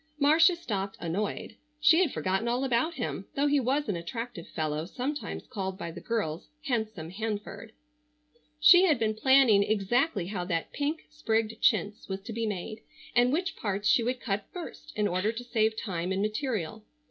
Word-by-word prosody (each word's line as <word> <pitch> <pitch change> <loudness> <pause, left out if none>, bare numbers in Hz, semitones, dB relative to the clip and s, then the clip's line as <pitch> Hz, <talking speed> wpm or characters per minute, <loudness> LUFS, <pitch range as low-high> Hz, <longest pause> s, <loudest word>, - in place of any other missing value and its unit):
Marcia 320 +5 +5
stopped 200 - -4
annoyed. 200 +6 -3 0.2
She 305 +3 +6
had 340 -8 +2
forgotten 190 +4 -1
all 245 +2 0
about 265 +6 +1
him, 240 -6 -4
though 280 - +2
he 290 0 +3
was 270 +3 0
an 205 - 0
attractive 215 +3 -6
fellow, 155 0 -2
sometimes 275 +8 -4
called 190 -6 -4
by 170 -4 -5
the 170 - -9
girls 195 -9 -2
"handsome 220 - -2
Hanford." 220 +2 -5 0.9
She 355 +5 +8
had 310 - +4
been 220 -1 +1
planning 255 -2 +5
exactly 215 - +1
how 185 -1 -3
that 170 -2 -2
pink 295 +3 -2
sprigged 225 -7 -1
chintz 205 0 +1
was 190 0 -3
to 225 +3 -7
be 225 0 -1
made, 215 +2 -5 0.3
and 245 +1 +5
which 360 +6 -1
parts 205 0 -2
she 235 - +5
would 250 +2 -1
cut 200 -3 -2
first 335 -3 -8
in 210 -1 +1
order 185 +4 0
to 230 +2 -6
save 220 -2 +1
time 180 -4 -3
and 190 +1 0
material. 215 - -2
220 Hz, 175 wpm, -29 LUFS, 195-265 Hz, 0.9 s, She